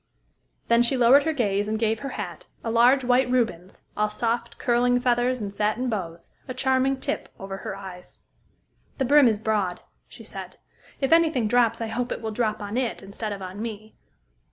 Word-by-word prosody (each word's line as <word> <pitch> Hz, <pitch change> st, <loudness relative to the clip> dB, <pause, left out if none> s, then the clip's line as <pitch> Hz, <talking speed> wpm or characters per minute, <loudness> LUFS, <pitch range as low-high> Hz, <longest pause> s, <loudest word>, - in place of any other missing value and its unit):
Then 235 Hz, 0 st, +4 dB
she 240 Hz, +3 st, +2 dB
lowered 255 Hz, +4 st, +6 dB
her 320 Hz, -, +2 dB
gaze, 205 Hz, -8 st, 0 dB
and 220 Hz, +1 st, -1 dB
gave 220 Hz, 0 st, 0 dB
her 275 Hz, -, -5 dB
hat -, -, -6 dB, 0.2 s
a 225 Hz, -, -2 dB
large 245 Hz, +4 st, +5 dB
white 250 Hz, +1 st, +3 dB
Rubens, 225 Hz, -8 st, -1 dB
all 210 Hz, 0 st, +1 dB
soft, 235 Hz, +2 st, -2 dB
curling 245 Hz, 0 st, +2 dB
feathers 245 Hz, 0 st, +1 dB
and 200 Hz, -2 st, -5 dB
satin 215 Hz, +5 st, 0 dB
bows 170 Hz, -5 st, -5 dB, 0.2 s
a 255 Hz, -, -5 dB
charming 265 Hz, +1 st, +1 dB
tip -, -, -3 dB
over 195 Hz, 0 st, -6 dB
her 195 Hz, -, -6 dB
eyes. 190 Hz, -2 st, -10 dB, 0.8 s
"The 265 Hz, -, 0 dB
brim 285 Hz, +1 st, +6 dB
is 220 Hz, -2 st, +2 dB
broad," 205 Hz, -4 st, -1 dB, 0.3 s
she -, -, -13 dB
said. -, -, -9 dB, 0.4 s
"If 270 Hz, +1 st, 0 dB
any 330 Hz, 0 st, +6 dB
thing 250 Hz, -8 st, 0 dB
drops, 230 Hz, 0 st, +2 dB
I 225 Hz, -, -2 dB
hope 240 Hz, +2 st, -3 dB
it -, -, -3 dB
will 220 Hz, -, -2 dB
drop 215 Hz, -1 st, -1 dB
on 205 Hz, +3 st, -4 dB
it, 250 Hz, -5 st, -2 dB
instead 210 Hz, +2 st, -5 dB
of 200 Hz, -1 st, -5 dB
on 185 Hz, +3 st, -7 dB
me. 215 Hz, -1 st, -6 dB
230 Hz, 195 wpm, -25 LUFS, 210-250 Hz, 0.8 s, lowered